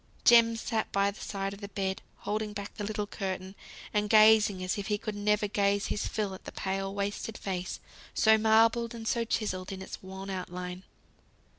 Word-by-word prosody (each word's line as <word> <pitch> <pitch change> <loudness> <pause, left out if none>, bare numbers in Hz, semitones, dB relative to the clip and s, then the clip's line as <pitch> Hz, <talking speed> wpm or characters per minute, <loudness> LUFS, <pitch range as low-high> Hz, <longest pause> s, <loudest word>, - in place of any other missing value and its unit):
Jem 230 -1 +7
sat 225 -1 -2
by 200 0 +2
the 205 - -14
side 195 -1 -3
of 200 - -11
the 200 - -5
bed, 190 -1 -2 0.2
holding 210 0 -2
back 200 -1 -6
the 210 - -6
little 210 0 -2
curtain, 190 -2 -4 0.4
and 210 -1 +1
gazing 215 -3 +6
as 185 - -1
if 200 - -4
he 210 - +1
could 215 0 -4
never 210 0 +1
gaze 200 0 +1
his - - -2
fill 210 -3 -2
at 190 - -11
the - - -6
pale, 195 0 -2
wasted 205 +2 -3
face, 185 -2 -4 0.4
so 220 0 +6
marbled 225 +2 +3
and 225 -1 -6
so 235 0 +1
chiselled 200 -5 -2
in 190 - -5
its - - -8
wan 190 +1 -7
outline. 180 -1 -5
205 Hz, 190 wpm, -30 LUFS, 195-220 Hz, 0.4 s, Jem